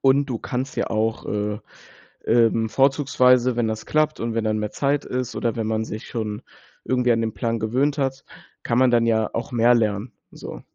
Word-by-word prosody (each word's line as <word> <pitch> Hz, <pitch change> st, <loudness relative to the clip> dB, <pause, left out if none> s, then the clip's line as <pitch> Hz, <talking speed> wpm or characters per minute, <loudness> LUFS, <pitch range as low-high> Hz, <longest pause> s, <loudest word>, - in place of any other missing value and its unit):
Und, 140 Hz, +1 st, +3 dB
du 125 Hz, -5 st, -3 dB
kannst 130 Hz, +4 st, -4 dB
ja -, -, -1 dB
auch, 110 Hz, +1 st, -1 dB
äh, 105 Hz, 0 st, -2 dB, 0.7 s
ähm, 115 Hz, -1 st, +3 dB
vorzugsweise 130 Hz, -2 st, +3 dB
wenn 120 Hz, -2 st, +1 dB
das 110 Hz, 0 st, -4 dB
klappt 155 Hz, 0 st, +1 dB
und 115 Hz, 0 st, -3 dB
wenn 115 Hz, -, 0 dB
dann 110 Hz, 0 st, 0 dB
mehr 105 Hz, 0 st, -3 dB
Zeit 145 Hz, 0 st, 0 dB
ist 125 Hz, -1 st, -3 dB
oder 115 Hz, 0 st, -1 dB
wenn 110 Hz, -1 st, -2 dB
man 110 Hz, 0 st, -1 dB
sich 110 Hz, 0 st, -7 dB
schon 105 Hz, -2 st, -4 dB, 0.4 s
irgendwie 125 Hz, -1 st, +1 dB
an 115 Hz, 0 st, +2 dB
den 110 Hz, -1 st, -2 dB
Plan 115 Hz, -2 st, -2 dB
gewöhnt 130 Hz, +7 st, 0 dB
hat, 135 Hz, -1 st, -2 dB, 0.4 s
kann 120 Hz, -, 0 dB
man 130 Hz, -1 st, +4 dB
dann 115 Hz, -1 st, +3 dB
ja 110 Hz, -1 st, +2 dB
auch 115 Hz, -, -4 dB
mehr 120 Hz, 0 st, +4 dB
lernen, 110 Hz, 0 st, 0 dB, 0.2 s
so. -, -, -9 dB
115 Hz, 200 wpm, -23 LUFS, 110-130 Hz, 0.7 s, man